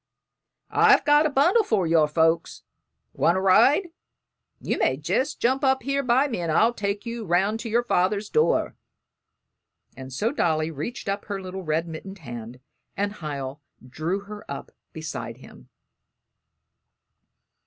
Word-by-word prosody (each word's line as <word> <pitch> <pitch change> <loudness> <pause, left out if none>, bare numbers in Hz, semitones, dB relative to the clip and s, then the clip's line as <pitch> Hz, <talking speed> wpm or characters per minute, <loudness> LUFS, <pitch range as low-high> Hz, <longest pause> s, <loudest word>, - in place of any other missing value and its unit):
"I've - - +5
got 295 +1 +5
a - - -2
bundle 345 - +3
for 210 - +1
your 160 -2 +3
folks. 160 +2 +1 0.5
Want 170 - +2
to - - +1
ride? 235 - +4 0.7
You - - -2
may 130 - +2
jest 190 - -1
jump 260 +4 +1
up 265 -2 +2
here 275 +2 0
by 260 +2 +3
me 235 -9 -4
and 170 -2 -2
I'll 225 +9 +3
take 205 0 -3
you 235 -1 -5
'round 195 +4 +1
to 230 - -5
your 235 +2 +2
father's 200 -1 +1
door;" 460 - +1 1.2
and 130 0 -9
so 205 - -1
Dolly 160 - 0
reached 160 - -6
up 200 +1 -2
her 200 -2 -4
little 190 0 -6
red 160 0 -1
mittened 190 +5 -8
hand, 120 -5 -9 0.4
and 205 +1 -2
Hiel 140 -3 -5 0.3
drew 160 +9 -3
her 210 +1 -10
up - - -7 0.2
beside - - -6
him. - - -16
195 Hz, 150 wpm, -25 LUFS, 160-240 Hz, 1.2 s, I've